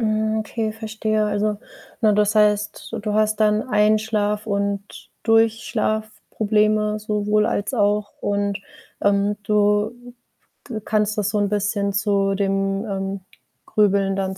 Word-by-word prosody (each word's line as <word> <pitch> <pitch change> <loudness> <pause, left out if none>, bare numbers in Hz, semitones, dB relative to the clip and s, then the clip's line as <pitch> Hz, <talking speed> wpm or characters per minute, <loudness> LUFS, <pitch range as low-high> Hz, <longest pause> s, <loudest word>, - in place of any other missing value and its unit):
Hm, 215 0 0
okay, 220 0 -3
verstehe. 215 -1 -1
Also, 210 0 -1 0.4
ne, 215 -2 +4
das 210 0 +2
heißt, 210 +1 +1
du 210 0 -2
hast 215 0 +1
dann 215 0 +3
Einschlaf 210 -1 +1
und 200 -1 -3
Durchschlafprobleme, 215 -1 +1
sowohl 210 0 +1
als 205 +6 -1
auch 205 -1 +1
und, 200 0 -1 0.4
ähm, 200 0 +2
du 210 +1 +2 0.8
d 225 -3 -4
kannst 215 0 0
das 210 -1 0
so 210 - -1
'n 205 -1 +1
bisschen 205 0 0
zu 195 0 +1
dem, 195 +1 0
ähm, 195 -1 -4 0.4
Grübeln 200 -2 +2
dann 190 -1 -2
210 Hz, 125 wpm, -22 LUFS, 200-215 Hz, 0.8 s, ne